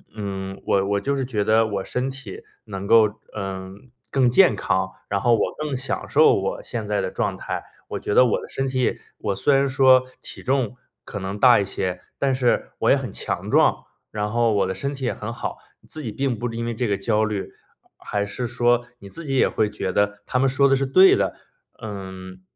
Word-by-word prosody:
嗯， 95 -2 -5
我 95 0 +2
我 100 0 +1
就 140 +5 0
是 135 - -1
觉 110 -5 -1
得 110 +1 +4
我 100 -2 -3
身 125 +2 -2
体 130 -8 -8 0.2
能 100 -2 -6
够， 110 -2 +4 0.2
嗯， 95 +4 -7 0.2
更 130 -3 +3
健 180 +9 +5
康， 95 0 0 0.2
然 100 -1 0
后 120 -1 +4
我 - - -1
更 150 -3 -3
享 130 +1 -3
受 450 -2 +5
我 - - -2
现 - - -4
在 - - 0
的 - - -2
状 - - -2
态。 - - -4 0.3
我 - - -4
觉 415 - -3
得 - - +7
我 480 - 0
的 445 - -10
身 135 0 -2
体 130 -1 -1
也 - - 0 0.2
我 100 -2 -2
虽 145 - +2
然 140 0 +3
说 130 -1 +5 0.2
体 - - -8
重 125 -3 0 0.3
可 100 - -6
能 95 +2 -4
大 125 -1 +7
一 100 - 0
些， 90 -1 -3 0.2
但 135 -1 +1
是 125 -2 +1
我 - - +2
也 - - +7
很 - - -4
强 - - -4
壮， - - +3 0.3
然 105 0 -2
后 115 -1 +2
我 100 -2 +2
的 95 - -2
身 140 +9 -3
体 135 - -8
也 - - 0
很 115 +2 -6
好， - - -5 0.3
自 155 - -7
己 115 -7 -4
并 135 -4 -1
不 120 +1 -2
因 115 0 -3
为 120 - -2
这 120 +1 -1
个 100 -1 0
焦 110 +2 +1
虑， 105 -3 -4 0.5
还 100 0 -2
是 110 +5 -4
说 120 0 +2
你 100 - -11
自 165 +7 -8
己 135 -2 -2
也 - - +4
会 105 -1 0
觉 105 -3 -3
得 100 +1 0
他 125 - 0
们 135 - +3
说 140 +1 +3
的 135 - +5
是 135 0 0
对 185 +8 +6
的， - - 0 0.5
嗯， 95 -3 -8
115 Hz, 240 characters per minute, -23 LUFS, 100-135 Hz, 0.5 s, 得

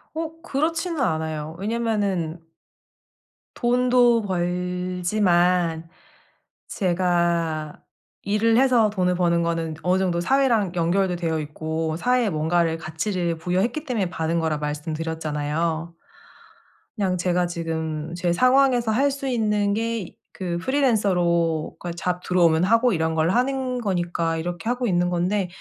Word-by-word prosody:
어. 325 0 -5
그렇지는 330 +1 -1
않아요. 160 - -2
왜냐하면은 200 -6 -1 1.2
돈도 245 -1 +3
벌지만 180 -1 0 0.8
제가 170 -4 0 0.4
일을 220 +3 +2
해서 250 -4 +4
돈을 180 -3 0
버는 170 -1 +2
거는 165 -1 -2
어느 180 +1 +2
정도 175 -2 0
사회랑 225 -4 +2
연결도 180 +2 +1
되어 165 -2 -1
있고 160 +1 -3
사회에 245 +4 +1
뭔가를, 165 +1 +1
가치를 170 +2 -2
부여했기 190 - -1
때문에 220 - -1
받은 165 0 -1
거라 160 -2 0
말씀드렸잖아요. 155 +1 -3 1.0
그냥 190 -4 0
제가 180 0 +1
지금 160 -2 -4
제 175 0 0
상황에서 255 +1 +3
할 275 +6 +3
수 275 0 -5
있는 210 -4 +1
게 225 -3 -3 0.2
그 175 -2 -3
프리랜서로 180 - +1
그 175 - -6
어 - - -2
잡 180 +1 -3
들어오면 170 -2 +3
하고 230 +5 +3
이런 160 -2 0
걸 160 +1 +1
하는 255 +3 0
거니까 175 -4 -1
이렇게 175 +4 -5
하고 245 0 0
있는 175 -1 +1
건데 180 +2 0
180 Hz, 280 characters per minute, -23 LUFS, 165-225 Hz, 1.2 s, 해서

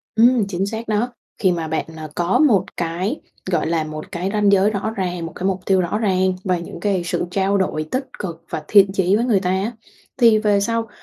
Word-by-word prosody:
Ừm, 230 -1 +4
chính 190 +1 -1
xác 225 +2 -5
đó, 220 +3 0 0.3
khi 185 -4 +3
mà 165 -2 -3
bạn, 160 - -1
ờ, 155 -1 -7
có 175 +2 +1
một 220 -12 +4
cái, 175 - -2 0.3
gọi 175 - +1
là, 165 -1 0
một 155 0 -8
cái 180 +3 -2
ranh 210 -1 +3
giới 200 +2 +4
rõ 210 +1 -2
ràng, 180 -3 -2
một 165 - -8
cái 185 - -4
mục 190 -1 0
tiêu 190 -1 +3
rõ 180 +4 -1
ràng 190 -3 +1
và 180 -2 +1
những 170 0 -8
cái 195 -3 0
sự 175 0 -1
trao 195 +2 +1
đổi 155 -5 -1
tích 260 +1 -2
cực 170 -4 -6
và 155 - -3
thiện 200 -2 +6
chí 190 +1 +2
với 235 - +1
người 215 -6 +2
ta 180 -1 -1
á, 195 +5 0 0.4
thì 230 -4 +5
về 210 -2 +2
sau 230 +1 -1
190 Hz, 235 wpm, -20 LUFS, 175-210 Hz, 0.4 s, thiện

